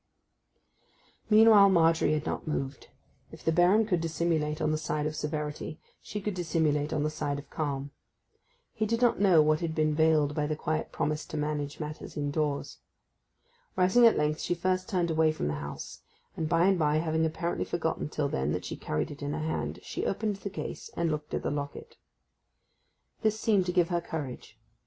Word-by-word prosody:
Meanwhile 215 -2 +7
Margery 165 -3 +4
had 155 -1 -1
not - - -3
moved. 135 -3 -3 0.4
If - - -13
the 165 - +3
Baron 180 +6 +4
could 180 -6 0
dissimulate 160 -2 -1
on 155 - +1
the 155 - +1
side 150 -1 -2
of 155 0 -2
severity 150 0 -4 0.2
she 210 - -5
could 210 0 -3
dissimulate 160 -4 0
on 145 - 0
the 155 - 0
side 145 -2 -2
of 145 - -10
calm. 140 -2 -3 0.8
He 215 -1 -1
did 230 +2 0
not 240 -1 +3
know 185 -6 +6
what 155 0 +2
had 165 -2 -3
been 155 -1 +2
veiled 155 -2 +3
by 150 -1 -1
the 155 - -1
quiet 155 +1 -2
promise 150 0 -1
to 155 - -5
manage 150 -1 -2
matters 155 0 -7
indoors. 145 0 -2 1.0
Rising 190 +6 +6
at 225 - +3
length 150 +1 +1
she 175 - -1
first 185 +3 -1
turned 175 -5 0
away 160 0 +3
from 155 - -3
the - - -1
house; 70 0 -7 0.3
and, 160 -1 -2
by 170 +1 +3
and 190 -2 +3
by, 150 -1 +2
having 160 0 0
apparently 170 +2 -1
forgotten 160 -3 -2
till 150 -1 -1
then 70 - -1
that - - -3
she - - -5
carried 75 - -2
it 145 - -10
in 145 +1 -3
her 155 0 -3
hand, 160 - -2
she - - -3
opened 205 0 -1
the 200 - -5
case, 195 - -6
and 170 -1 +1
looked 150 -1 -3
at - - -3
the - - -1
locket. 145 0 -6 1.2
This 220 -1 +1
seemed 205 -6 +2
to - - +1
give 175 -1 +2
her 175 -1 0
courage. 135 -9 -6
155 Hz, 195 wpm, -29 LUFS, 150-175 Hz, 1.2 s, Meanwhile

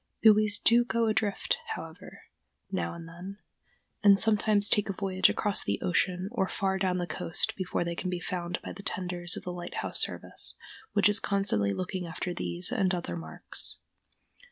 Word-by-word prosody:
Buoys 215 -1 +6
do 235 +1 +5
go 230 -1 0
adrift, 215 -2 0 0.2
however, - - -10 0.5
now 85 -2 -2
and 170 -1 -9
then, 180 +4 -9 0.7
and 200 -1 +8
sometimes 210 -1 +4
take 210 0 +2
a - - 0
voyage 190 -1 +2
across 205 -2 0
the 100 - -1
ocean 180 - +1
or 190 -6 0
far 190 0 -1
down 185 -1 +1
the 175 - -1
coast 175 +6 -1
before 185 -2 -2
they 170 0 -3
can 185 +2 -4
be 180 -1 -2
found 175 -1 -3
by - - -6
the - - -10
tenders 180 -2 -1
of - - -7
the 180 - -4
Lighthouse 175 0 -2
Service, - - -2 0.4
which 205 -2 +5
is 205 +1 +4
constantly 195 - +1
looking 185 - -3
after 175 +2 -4
these 175 +4 +1
and 195 -7 +1
other 175 - -4
marks. 165 - -5
185 Hz, 175 wpm, -29 LUFS, 175-205 Hz, 0.7 s, and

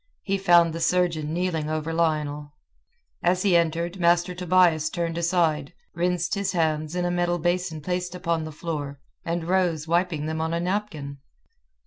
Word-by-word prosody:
He 195 -1 -1
found 175 -3 +5
the 165 - -4
surgeon 165 -3 +1
kneeling 165 -3 -1
over 155 +1 -2
Lionel. 150 -3 -1 0.7
As 180 +1 +2
he 195 -4 +3
entered, 170 +2 0
Master 175 +1 +3
Tobias 175 -3 +3
turned 170 0 -2
aside, 165 -4 0 0.2
rinsed 175 -1 0
his 200 -2 -1
hands 155 -1 0
in 180 -1 0
a 175 - 0
metal 175 0 +1
basin 175 -1 -1
placed 180 +2 -3
upon 170 -3 -1
the 155 - -6
floor, 145 -3 -5 0.2
and 170 0 -2
rose 170 -3 0
wiping 170 -2 0
them 160 0 -2
on 160 +1 -1
a - - 0
napkin. 170 -7 -3
170 Hz, 160 wpm, -25 LUFS, 155-180 Hz, 0.7 s, found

